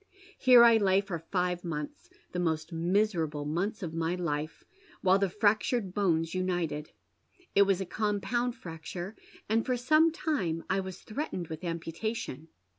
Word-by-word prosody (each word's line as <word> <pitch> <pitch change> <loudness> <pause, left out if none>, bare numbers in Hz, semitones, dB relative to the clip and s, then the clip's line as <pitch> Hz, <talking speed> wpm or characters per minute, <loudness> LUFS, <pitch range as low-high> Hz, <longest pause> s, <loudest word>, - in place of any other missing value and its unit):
Here 250 -2 +8
I 230 -1 +7
lay 195 -2 +3
for 195 -4 -4
five 180 +1 -1
months 150 -4 -5
— - - -36
the 180 - -3
most 160 -1 -1
miserable 165 -4 0
months 195 +8 -2
of 165 -2 -4
my 165 +1 -1
hfe 155 -3 -3 0.2
— 415 - -26
while 190 +1 +5
the 195 - +2
frac 205 +3 +3
tured 205 -7 -1
bones 165 -5 +1
united. 175 -5 -1 0.6
It 200 0 +5
was 195 -2 +2
a 190 - -2
compound 220 +5 -1
fracture, 175 +4 -7 0.3
and 225 +2 +2
for 255 -1 0
some 310 +6 +4
time 295 - -1
I 190 - +2
was 190 -1 -6
threatened 215 - -4
with 160 +2 -7
amputation. 165 - -4
185 Hz, 165 wpm, -30 LUFS, 165-215 Hz, 0.6 s, Here